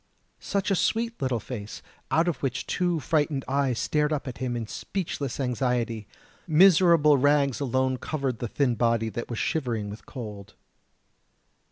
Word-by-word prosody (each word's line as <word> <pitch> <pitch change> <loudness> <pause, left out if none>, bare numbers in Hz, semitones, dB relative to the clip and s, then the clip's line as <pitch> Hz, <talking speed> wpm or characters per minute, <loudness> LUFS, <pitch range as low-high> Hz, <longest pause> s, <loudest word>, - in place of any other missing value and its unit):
Such 200 0 -1
a - - +4
sweet 230 +3 0
little 130 -3 0
face, 105 -2 -7 0.3
out 165 +2 +2
of 170 -7 0
which 130 -3 -2
two 175 -2 0
frightened 145 -2 0
eyes 135 -3 +1
stared 150 +3 +1
up 150 -2 -2
at 125 - -6
him 125 -2 -2
in 115 - -3
speechless 145 - -4
anxiety. 125 -4 -1 0.4
Miserable 165 -3 +6
rags 140 -1 +3
alone 130 -1 0
covered 135 -3 -3
the 120 - -2
thin 130 +2 +1
body 115 -1 +1
that 120 +2 -5
was 120 - -4
shivering 115 -10 -1
with 105 - -11
cold. 105 -7 -8
130 Hz, 155 wpm, -26 LUFS, 120-150 Hz, 0.4 s, Miserable